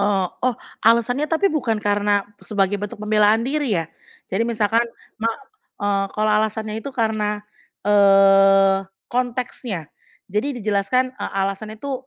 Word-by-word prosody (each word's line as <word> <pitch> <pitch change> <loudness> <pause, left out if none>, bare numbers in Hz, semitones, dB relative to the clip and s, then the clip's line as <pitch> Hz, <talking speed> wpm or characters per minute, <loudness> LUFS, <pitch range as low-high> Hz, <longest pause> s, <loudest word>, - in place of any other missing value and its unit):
Oh 200 -2 +1 0.2
oh, 255 - +2 0.3
alasannya 240 +6 +3
tapi 330 +5 +2
bukan 250 -8 0
karena 205 -1 +1 0.2
sebagai 200 -1 0
bentuk 205 0 -5
pembelaan 210 +1 +3
diri 275 -5 0
ya 165 - -1 0.5
jadi 195 +4 +1
misalkan 225 0 +1 0.4
ma 225 - +1 0.5
eee, 200 -1 +1
kalau 215 0 +2
alasannya 215 0 0
itu 250 - -6
karena, 215 -3 -1 0.4
eee, 195 -1 +5 0.3
konteksnya. 245 - -3 0.4
Jadi 215 +9 -1
dijelaskan, 215 +5 +1
eee, - - -4
alasan 195 +2 -2
itu, 265 +2 -6
210 Hz, 130 wpm, -21 LUFS, 200-235 Hz, 0.5 s, eee